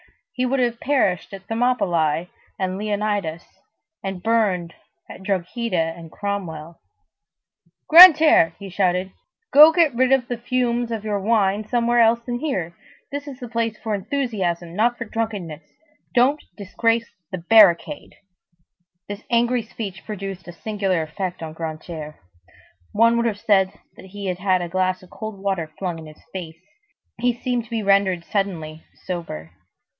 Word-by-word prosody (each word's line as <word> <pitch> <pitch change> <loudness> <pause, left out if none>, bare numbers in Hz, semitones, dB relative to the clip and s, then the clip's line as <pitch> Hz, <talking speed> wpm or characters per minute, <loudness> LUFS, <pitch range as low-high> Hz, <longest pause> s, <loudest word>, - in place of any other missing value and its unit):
He 255 -1 -1
would 270 +2 0
have 240 -2 0
perished 255 - 0
at 195 0 -13
Thermopylæ 180 -9 +1 0.3
with 190 -1 0
Leonidas, 205 -4 -2 0.6
and 190 -2 -5
burned 200 -7 +1 0.3
at - - -11
Drogheda 185 -2 -1
with 165 -1 -12
Cromwell. 170 -6 -5 1.1
"Grantaire," 320 - +8
he 200 - -9
shouted, 185 0 0 0.4
"go 300 +3 +10
get 325 -4 +3
rid 255 +2 +2
of 265 -2 +3
the 245 -2 -4
fumes 240 -1 -1
of 225 -2 -4
your 210 -2 -1
wine 205 0 +1
somewhere 240 +1 +1
else 230 0 +5
than 240 -1 -3
here. 185 - -3 0.4
This 285 +1 -5
is 275 -2 -8
the 245 - -7
place 230 -1 -2
for 220 0 -4
enthusiasm, 190 - -2
not 240 +4 +2
for 235 - -5
drunkenness. 205 -9 -4 0.5
Don't 265 +5 +3 0.2
disgrace 230 +3 -1 0.2
the 185 - -3
barricade!" 175 -4 +4 0.9
This 205 +1 -7
angry 240 +1 +2
speech 210 -4 -8
produced 195 -3 -7
a - - -7
singular 195 -2 -2
effect 180 +2 -5
on 160 -1 -6
Grantaire. 155 -1 -7 0.8
One 230 +2 +4
would 235 0 +1
have 205 -3 -3
said 190 -3 +2 0.2
that - - -13
he 200 +1 -8
had 180 -1 -3
had 185 -1 +1
a 175 - -5
glass 185 +1 -1
of 180 - -17
cold 215 -2 -7
water 190 -5 -2
flung 175 -4 -4
in 160 - -10
his 155 - -15
face. 165 -4 -7 0.6
He 245 +1 +2
seemed 245 -3 -2
to - - -19
be 225 -2 -2
rendered 195 -3 +2
suddenly 165 -6 -3 0.2
sober. 160 - -6
200 Hz, 150 wpm, -22 LUFS, 180-235 Hz, 1.1 s, go